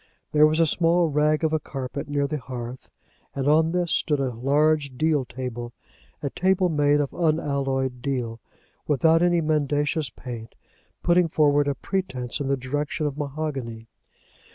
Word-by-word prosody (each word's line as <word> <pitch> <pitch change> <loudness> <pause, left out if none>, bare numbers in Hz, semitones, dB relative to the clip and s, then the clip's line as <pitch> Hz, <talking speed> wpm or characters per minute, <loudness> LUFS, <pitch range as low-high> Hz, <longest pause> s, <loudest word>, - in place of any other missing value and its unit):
There 150 0 +6
was 155 +1 0
a 165 - +5
small 170 +1 +2
rag 150 +2 +2
of 160 0 +1
a 155 - +2
carpet 135 0 -6
near 145 -1 +1
the 150 +1 -3
hearth, 125 -1 -7 0.5
and 135 0 -1
on 160 +2 +4
this 175 -2 0
stood 150 -2 +1
a 130 -2 -1
large 140 +2 +1
deal 155 -3 +2
table, 120 -1 -6 0.5
a 140 - -2
table 185 0 +2
made 145 -2 +3
of 145 -2 -1
unalloyed 140 -6 0
deal, 120 -4 -3 0.5
without 160 +3 +4
any 175 -1 +3
mendacious 150 -1 0
paint, 115 -2 -9 0.5
putting 175 0 +4
forward 145 -2 +3
a 140 - 0
pretence 135 -12 -3
in 140 - -2
the 140 0 +1
direction 145 +4 -2
of 145 -2 -2
mahogany. 135 -6 -4
145 Hz, 155 wpm, -24 LUFS, 130-155 Hz, 0.5 s, There